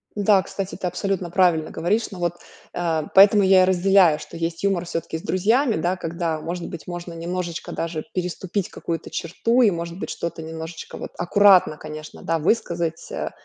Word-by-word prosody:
Да, 205 Hz, -2 st, +4 dB
кстати, 195 Hz, 0 st, -5 dB
ты -, -, -4 dB
абсолютно 180 Hz, 0 st, -2 dB
правильно 175 Hz, -3 st, +2 dB
говоришь. 200 Hz, +8 st, 0 dB
Но 190 Hz, -, -9 dB
вот, 175 Hz, -1 st, -1 dB, 0.4 s
э, 165 Hz, -3 st, 0 dB
поэтому 200 Hz, +2 st, +7 dB
я 190 Hz, -1 st, +6 dB
и -, -, +4 dB
разделяю, 185 Hz, -3 st, +4 dB
что 170 Hz, -, -10 dB
есть 165 Hz, 0 st, -3 dB
юмор 195 Hz, -3 st, +1 dB
всё-таки 165 Hz, -2 st, -4 dB
с -, -, -12 dB
друзьями, 225 Hz, +6 st, +2 dB
да, 175 Hz, +3 st, 0 dB
когда, 165 Hz, -2 st, -3 dB
может 170 Hz, +2 st, -5 dB
быть, 165 Hz, -, -9 dB
можно 175 Hz, -1 st, -6 dB
немножечко 170 Hz, 0 st, -4 dB
даже 165 Hz, -2 st, -3 dB
переступить 180 Hz, +1 st, -3 dB
какую-то 165 Hz, -1 st, -5 dB
черту, 230 Hz, +9 st, +1 dB
и, 220 Hz, -, +6 dB
может 170 Hz, 0 st, -5 dB
быть, -, -, -5 dB
что-то 170 Hz, -1 st, -5 dB
немножечко 160 Hz, +1 st, -7 dB
вот -, -, -7 dB
аккуратно, 185 Hz, -2 st, +5 dB
конечно, 155 Hz, 0 st, -9 dB
да, 165 Hz, 0 st, 0 dB
высказать, 170 Hz, -2 st, -1 dB
э, -, -, -3 dB
175 Hz, 180 wpm, -23 LUFS, 165-190 Hz, 0.4 s, поэтому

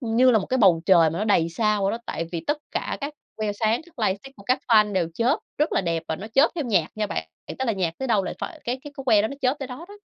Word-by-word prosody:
như 245 Hz, +1 st, +4 dB
là 225 Hz, -, +5 dB
một 195 Hz, -, -4 dB
cái 260 Hz, -, 0 dB
bầu 180 Hz, -7 st, +5 dB
trời 170 Hz, -4 st, +6 dB
mà 165 Hz, -, -4 dB
nó 210 Hz, -, 0 dB
đầy 170 Hz, -6 st, +3 dB
sao 210 Hz, +3 st, 0 dB
vậy 195 Hz, -, +2 dB
đó, 230 Hz, -, -3 dB
tại 165 Hz, -, -3 dB
vì 170 Hz, -, -2 dB
tất 295 Hz, +1 st, 0 dB
cả -, -, -3 dB
các 290 Hz, +1 st, -4 dB, 0.2 s
que 215 Hz, -2 st, -1 dB
sáng, 220 Hz, +3 st, +1 dB
các 335 Hz, -6 st, -22 dB
lightstick 205 Hz, +9 st, -4 dB
của 200 Hz, -, -13 dB
các 255 Hz, +6 st, +1 dB
fan 210 Hz, -2 st, +5 dB
đều 175 Hz, -3 st, 0 dB
chớp 245 Hz, +6 st, +2 dB, 0.2 s
rất 300 Hz, -, +1 dB
là -, -, +2 dB
đẹp 165 Hz, -3 st, -1 dB
và 160 Hz, -, -1 dB
nó 200 Hz, -, -7 dB
chớp 270 Hz, +8 st, +4 dB
theo 315 Hz, -5 st, -2 dB
nhạc 190 Hz, -9 st, +1 dB
nha 215 Hz, -1 st, -1 dB
bạn, 80 Hz, -, -4 dB, 0.3 s
tức 265 Hz, -, -1 dB
là 225 Hz, -, +2 dB
nhạc 180 Hz, -4 st, -1 dB
tới 265 Hz, -1 st, -3 dB
đâu 205 Hz, -4 st, +2 dB
là -, -, -3 dB
phải 325 Hz, -3 st, -6 dB
cái 245 Hz, +2 st, -2 dB
cái 290 Hz, -, -9 dB
que 215 Hz, -5 st, +5 dB
đó 220 Hz, -, 0 dB
nó 280 Hz, -, -6 dB
chớp 260 Hz, +3 st, +2 dB
tới 270 Hz, -2 st, -5 dB
đó 255 Hz, +7 st, -8 dB
đó. 410 Hz, 0 st, -12 dB
220 Hz, 310 wpm, -24 LUFS, 190-260 Hz, 0.3 s, trời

